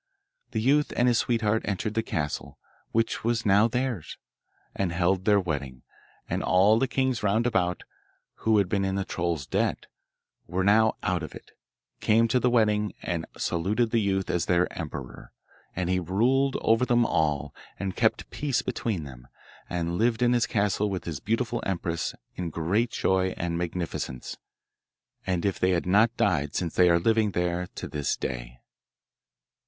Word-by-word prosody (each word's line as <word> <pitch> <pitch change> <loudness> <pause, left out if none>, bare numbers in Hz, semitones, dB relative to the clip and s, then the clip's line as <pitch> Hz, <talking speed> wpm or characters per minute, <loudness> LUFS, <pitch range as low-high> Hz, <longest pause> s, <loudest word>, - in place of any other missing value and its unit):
The - - -2
youth 140 +6 +2
and 120 - +3
his 120 -2 +3
sweetheart 110 -2 +1
entered 105 +1 -2
the 115 - +1
castle, 80 -10 -4 0.3
which 115 0 0
was 115 0 0
now 105 +2 +5
theirs, 125 - -3 0.6
and 95 -3 -1
held 90 +2 +1
their 105 -1 +5
wedding; 70 -8 -4 0.4
and - - -2
all 100 +6 +4
the 135 - +1
kings 130 -2 0
roundabout, 100 -4 +1 0.5
who 110 0 +2
had 100 -2 +3
been 100 +1 0
in 95 0 -1
the 100 -1 -1
troll's 85 -5 -2
debt, - - -1 0.6
and - - -11
were 95 - +2
now 110 +2 +4
out 90 -2 0
of 80 - -7
it, - - -12 0.5
came 115 +2 +3
to 125 - +3
the 125 - +2
wedding, 105 -3 +2
and 85 -2 -3
saluted 105 +7 0
the 115 - +2
youth 95 -2 0
as 85 - -1
their 90 0 +3
emperor, 70 -6 -7 0.4
and 90 -1 -1
he 90 0 +1
ruled 125 +10 +1
over 115 +2 +3
them 120 -1 +3
all, 75 - 0 0.2
and 95 -1 -4
kept - - +1
peace 140 -5 -1
between 115 -8 -2
them, 65 -4 -11 0.4
and 85 0 -2
lived 115 +1 +2
in 120 0 +4
his 120 -1 +2
castle 105 0 +1
with 95 -2 -3
his 80 -5 -4
beautiful 115 - -1
empress 85 -3 -2 0.2
in 90 -2 -4
great 95 +9 0
joy 95 -4 0
and 85 -1 -2
magnificence. 85 -7 -4 0.9
And 90 -1 0
if 100 - 0
they 90 - +2
have 85 - 0
not 110 +5 +3
died 75 -7 +1
since 85 -3 -1
they 90 -1 +5
are 85 - +5
living 110 +2 +2
there 90 0 -1
to - - -5
this 75 -2 -1
day. - - -5
95 Hz, 170 wpm, -27 LUFS, 85-115 Hz, 0.9 s, now